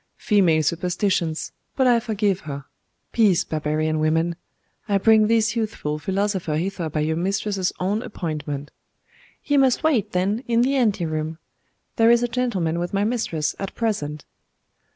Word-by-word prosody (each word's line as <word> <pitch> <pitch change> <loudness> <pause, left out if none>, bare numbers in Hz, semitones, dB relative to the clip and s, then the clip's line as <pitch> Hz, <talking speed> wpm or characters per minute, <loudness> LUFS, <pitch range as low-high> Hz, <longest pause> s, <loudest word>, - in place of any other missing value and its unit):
'Female 175 -7 +3
superstitions 170 0 -1 0.2
but 265 - +2
I 240 -2 +5
forgive 210 -4 0
her. 140 -4 -7 0.5
Peace, 205 -7 +3
barbarian 155 0 -1
women! 160 +2 +1 0.5
I 200 - +3
bring 215 +1 +5
this 220 0 +2
youthful 210 -10 -2
philosopher 190 -3 -1
hither 175 -1 -2
by 155 0 -2
your 160 +1 0
mistress's 195 +1 -1
own 200 +4 0
appointment.' 150 - -5 0.7
'He 290 - +1
must 265 -1 +3
wait, 235 -10 +2
then, 200 +6 0
in 235 0 +3
the 265 +3 +2
ante 215 -9 +2
room. 155 0 -3 0.6
There 225 -1 +5
is 235 0 +5
a - - +2
gentleman 215 -10 -1
with 175 +3 -3
my 200 - +2
mistress 210 -9 -1
at 195 - -5
present. 155 -11 -2
195 Hz, 150 wpm, -23 LUFS, 160-225 Hz, 0.7 s, I